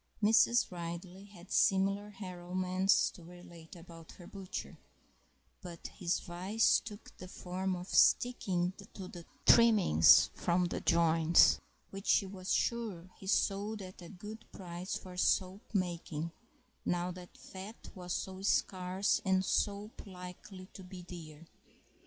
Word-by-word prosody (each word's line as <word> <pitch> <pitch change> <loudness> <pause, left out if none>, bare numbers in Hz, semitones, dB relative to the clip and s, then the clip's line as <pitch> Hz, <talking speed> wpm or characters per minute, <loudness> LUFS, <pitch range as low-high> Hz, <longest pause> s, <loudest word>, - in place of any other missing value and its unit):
Mrs. 225 +2 +4
Ridley 175 +2 -7
had 195 -3 -15
similar 195 +2 +2
harrowments 185 -1 0
to 175 - -14
relate 170 -1 -13
about 165 -1 -13
her 175 - -13
butcher, 195 -1 -7 0.8
but 175 -2 -10
his 180 -3 -1
vice 185 +6 +2
took 210 -1 -11
the 185 - -8
form 185 +1 -3
of 180 +1 -7
sticking 190 -9 +3 0.2
to 190 -2 -7
the 175 -2 -11 0.2
trimmings 100 - +6
from 180 0 +1
the 175 - -3
joints, 165 0 +4 0.3
which 195 0 -8
she - - +4
was 190 -1 -6
sure 205 -7 -1
he 190 - -10
sold 205 +2 0
at 185 0 -11
a 170 - -10
good 210 +4 -10
price 180 +1 -6
for 185 -1 -8
soap 185 +2 +1
making, 170 -4 -2 0.5
now 175 +1 -1
that 180 0 -12
fat 195 +4 -10
was 180 -2 -8
so 190 +1 -4
scarce 190 0 +1
and 190 -1 +2
soap 205 +2 -2
likely 185 0 -10
to 190 - -10
be 180 -1 -10
dear. 165 -3 -10
185 Hz, 135 wpm, -33 LUFS, 175-195 Hz, 0.8 s, trimmings